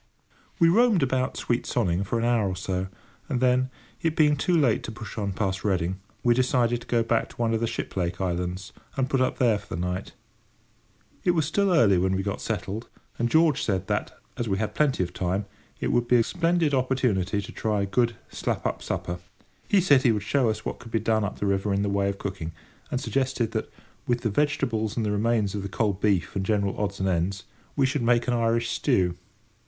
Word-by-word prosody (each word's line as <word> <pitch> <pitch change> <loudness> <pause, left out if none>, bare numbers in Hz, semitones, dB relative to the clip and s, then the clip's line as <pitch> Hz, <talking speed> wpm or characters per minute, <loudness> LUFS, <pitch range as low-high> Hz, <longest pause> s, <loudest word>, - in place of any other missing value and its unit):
We 170 - +5
roamed 210 - +4
about 130 -1 0
sweet 120 0 -1
Sonning 95 -5 +1
for 100 +4 -1
an 115 - 0
hour 115 -5 +2
or 95 - -3
so, 90 0 -2 0.4
and 130 -4 0
then, 130 0 +3 0.3
it 165 -1 0
being 150 -2 +4
too 170 +5 +1
late 130 -8 +3
to - - -5
push 110 -3 -8
on 100 -3 -2
past 95 -1 -2
Reading, 95 -2 0 0.2
we 120 - +5
decided 120 -1 +2
to - - -13
go 115 -1 +2
back 115 0 0
to - - -15
one 115 -1 0
of 110 - +1
the 115 - 0
Shiplake 90 -6 -3
islands, 90 0 -3 0.2
and 130 -1 +1
put 135 -1 +1
up 130 - +1
there 115 -5 +3
for 105 -4 -7
the - - -4
night. 90 +2 -3 1.1
It 175 - +3
was 160 -3 +2
still 195 +5 +1
early 105 - +5
when 95 +1 +1
we 95 - -1
got 100 0 -3
settled, 110 +1 -4 0.3
and 120 0 +1
George 160 +1 +4
said 95 -4 0
that, - - -2 0.2
as 115 -2 -2
we 95 - +1
had 110 +1 -2
plenty 140 -10 +2
of 90 - -5
time, 95 +3 -1 0.3
it - - -1
would 120 -1 +2
be 125 - +4
a 120 - +5
splendid 170 0 +1
opportunity 125 -7 +1
to 100 - -6
try 105 -2 -1
a - - +1
good, 115 +4 +1 0.2
slap - - -2
up - - -1
supper. 90 0 -3 0.5
He 200 - +4
said 145 -7 +5
he 125 - +4
would 105 -2 -1
show 125 +2 +2
us 110 0 -3
what - - -4
could 115 - -12
be 115 - +1
done 110 0 +1
up 100 - -3
the - - -2
river 100 0 +1
in 100 - +1
the 100 - 0
way 100 0 +1
of 100 - -4
cooking, 95 -5 -5 0.4
and 130 - -1
suggested 130 -4 -1
that, 110 - -3 0.4
with 120 -1 +1
the 110 - 0
vegetables 115 -5 0
and 115 - +1
the 105 - 0
remains 105 -1 +1
of 105 - -3
the 100 - -5
cold 100 -2 -1
beef 95 -4 +1
and 95 - 0
general 100 -1 0
odds 100 -1 -2
and 95 - 0
ends, 90 +1 0 0.3
we 140 - +3
should 135 +1 0
make 120 +1 +2
an 125 - +2
Irish 115 0 +1
stew. 90 -2 +1
110 Hz, 225 wpm, -26 LUFS, 100-125 Hz, 1.1 s, We